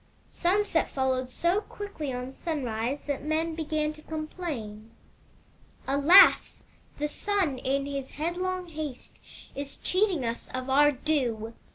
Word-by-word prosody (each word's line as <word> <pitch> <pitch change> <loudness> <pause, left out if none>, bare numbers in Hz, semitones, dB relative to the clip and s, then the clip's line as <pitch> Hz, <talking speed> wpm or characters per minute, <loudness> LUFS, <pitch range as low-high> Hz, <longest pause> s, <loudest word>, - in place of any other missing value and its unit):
Sunset 370 -1 +1
followed 260 -1 0
so 345 +9 +1
quickly 400 -11 -6
on 250 +1 -4
sunrise 265 -4 -2
that 285 -2 -3
men 320 +2 0
began 310 -1 -1
to 310 - -14
complain: 305 -10 -6 0.5
" - - -31
*Alas! 285 +8 +6 0.3
The 295 - -1
Sun, 355 -4 -1
in 275 +2 0
his 275 -2 -4
headlong 360 +3 -2
haste, 305 -5 -7 0.3
is 280 0 -6
cheating 370 - +1
us 230 0 -4
of 255 +1 -3
our 290 +2 +6
due. 245 -6 -1
295 Hz, 130 wpm, -28 LUFS, 260-335 Hz, 0.5 s, Alas